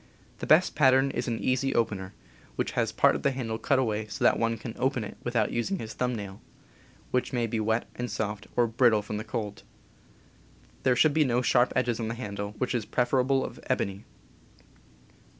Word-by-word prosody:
The - - -5
best 165 +4 +5
pattern 135 -1 +4
is 120 - -3
an 115 -1 -1
"easy 130 +3 0
opener," 100 -5 -1 0.4
which - - -1
has - - 0
part - - +4
of - - -3
the - - +2
handle 115 -4 -3
cut 140 - +2
away 110 -4 0
so 100 - -5
that - - +4
one 115 0 0
can 115 +1 -7
open 130 -3 0
it 105 - -7
without 120 -3 0
using 155 +12 -1
his 110 -8 -6
thumb 125 -1 -1
nail, 100 -2 -7 0.7
which 125 +1 0
may 120 -2 +1
be 115 0 -2
wet 110 +2 0
and 125 0 -4
soft, 105 -1 -3
or 120 - +4
brittle 115 -2 +3
from 105 0 -4
cold. 110 -3 -5 1.2
There 130 -1 +3
should 150 +4 +4
be 155 0 +4
no 125 -2 +1
sharp 125 0 +3
edges 120 -2 +1
on 115 - -2
the 115 - -3
handle, 100 -3 -5
which 125 +4 -1
is 120 -3 0
pref 120 +3 -1
erably 135 0 +2
of - - -8
ebony. 100 +1 -1
120 Hz, 200 wpm, -28 LUFS, 110-130 Hz, 1.2 s, best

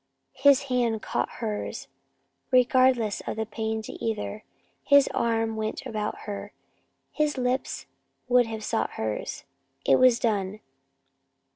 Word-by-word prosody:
His 280 0 +5
hand 240 -4 0
caught - - -1
hers, 215 -3 -4 0.6
regardless 255 -4 +3
of - - -2
the 220 0 -2
pain 220 0 -3
to - - -7
either. 215 -1 -3 0.4
His 280 -1 +6
arm 225 -1 0
went 220 0 -3
about 215 -1 -3
her, 205 -1 -6 0.6
his 300 -2 0
lips 255 +1 -1 0.4
would 245 -1 +4
have 220 -1 -5
sought - - -1
hers. - - -4 0.4
It - - +5
was 255 -2 +6
done! 205 -3 -1
230 Hz, 125 wpm, -26 LUFS, 220-255 Hz, 0.6 s, His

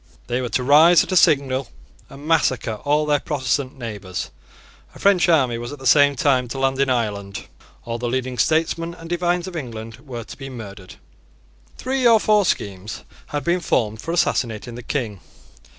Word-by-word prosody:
They 120 +1 -2
were 125 - -3
to 125 +3 -1
rise 155 +6 +6
at - - -7
a - - +1
signal 135 -5 +3 0.4
and 140 +2 -12
massacre 135 -8 +1
all 150 +1 +2
their 145 -1 +2
Protestant 135 -2 -2
neighbours. 105 -7 -6 0.6
A - - -12
French 195 -3 +3
army 130 -8 +3
was 120 +1 -6
at 145 - -7
the 130 - -11
same 145 +2 +5
time 130 -2 +2
to 130 - -6
land 135 0 0
in 140 -1 +2
Ireland. 100 -5 -2 0.4
All 115 0 -4
the 120 0 -2
leading 130 0 -3
statesmen 165 +1 +1
and 165 - -11
divines 175 0 0
of 185 -2 -8
England 115 -7 -7
were 125 -4 -7
to - - -11
be 135 -1 -7
murdered. 100 -7 -10 0.8
Three 260 -1 +1
or 230 -2 +6
four 210 -2 +3
schemes 100 - -3 0.2
had 145 -1 -3
been 175 +4 +1
formed 110 -9 -1
for 165 - -4
assassinating 120 -8 -1
the 120 - -8
King. 115 -6 -3
135 Hz, 180 wpm, -21 LUFS, 115-160 Hz, 0.8 s, rise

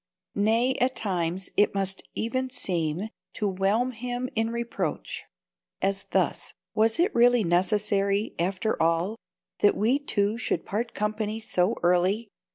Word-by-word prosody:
Nay, 225 +5 +2
at 255 +1 +2
times, 180 -2 -2
it 205 0 +3
must 195 -1 0
even 255 +3 -1
seem 180 - -2 0.2
to 210 - -1
whelm 200 +6 +1
him 245 +1 -4
in 225 0 +1
reproach. 230 -8 -3 0.5
As 195 0 0
thus: - - -1 0.2
"Was 220 +1 +3
it 365 +6 +3
really 245 -1 +5
necessary, 200 +3 +1
after 190 +5 0
all, 165 +7 +1 0.4
that 205 - +4
we 240 +7 +2
two 215 -5 0
should 180 -8 -1
part 230 +4 -3
company 215 +1 -2
so 215 -1 +1
early? 185 +5 +2
210 Hz, 135 wpm, -27 LUFS, 190-230 Hz, 0.5 s, really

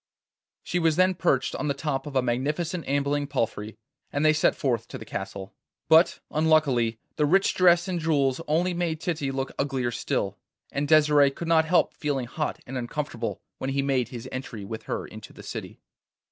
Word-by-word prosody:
She 180 - -1
was 165 -2 +3
then 185 +2 +4
perched 135 -6 +1
on - - -2
the 140 - 0
top 140 -1 -2
of 145 - -7
a 130 - +3
magnificent 150 +8 -1
ambling 145 +1 0
palfrey, 110 -6 -2 0.3
and 145 +2 0
they 155 - +6
set 155 - +3
forth 120 -4 -1
to - - -7
the 110 - -10
castle. 95 -1 -6 0.4
But 160 +2 +5
unluckily 150 -8 +2 0.2
the 150 - +3
rich 195 +5 +3
dress 175 0 +4
and 180 -2 -1
jewels 145 -3 +1
only 170 +4 +1
made 170 -2 -1
Titty 155 -5 -2
look 135 0 -3
uglier 135 -3 0
still, 120 - -2 0.3
and 145 +1 -1
Desire 150 -2 +5
could 165 +5 -7
not 160 -1 +4
help 175 +2 +3
feeling 140 -4 -2
hot 150 +6 -3
and 130 0 -4
uncomfortable 120 -1 -4 0.2
when 130 - -2
he 140 0 0
made 130 -4 +1
his 120 -2 -8
entry 120 -5 -6
with 110 +2 -7
her - - -2
into - - -11
the - - -12
city. - - -7
145 Hz, 190 wpm, -26 LUFS, 130-160 Hz, 0.4 s, they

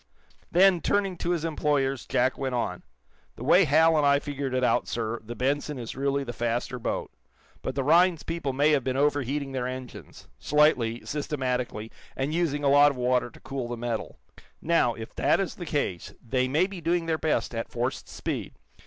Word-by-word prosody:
Then, 180 0 +5
turning 195 -2 +1
to 170 - -3
his 170 -2 0
employers, 145 -4 0
Jack 130 +1 +1
went 130 -2 -3
on: 120 - -2 0.5
"The - - -8
way 180 +7 +5
Hal 160 +2 +4
and 150 - +3
I 140 0 +5
figured 140 -2 -4
it 130 - +1
out, - - +2
sir, 115 0 -3
the 120 +2 -7
'Benson' 145 +3 -1
is 120 -2 -6
really 140 +1 0
the 120 -2 -6
faster 120 +2 -2
boat. - - -3 0.5
But 130 - -4
the 135 - 0
Rhinds 170 +3 +4
people 165 -4 -3
may 145 +4 +3
have 140 -4 +2
been 130 +1 -1
overheating 140 -1 0
their 130 -2 -2
engines 130 -1 -9
slightly, 130 -6 +2
systematically, 125 -6 -3 0.2
and 135 +3 -2
using 155 -4 0
a - - +3
lot 145 +1 +7
of 140 - -5
water 125 0 +1
to - - -17
cool 135 -3 -4
the 120 0 -5
metal. 115 -1 -4 0.4
Now, 155 -8 +2
if 110 0 -8
that - - +2
is 195 - -1
the 175 - -8
case, 140 - -2
they 130 +1 +1
may 150 +7 +2
be 190 -2 -7
doing 170 +1 0
their 160 -1 -1
best 155 -5 0
at 115 0 -4
forced 125 +2 -3
speed. - - -4
140 Hz, 195 wpm, -27 LUFS, 125-155 Hz, 0.5 s, lot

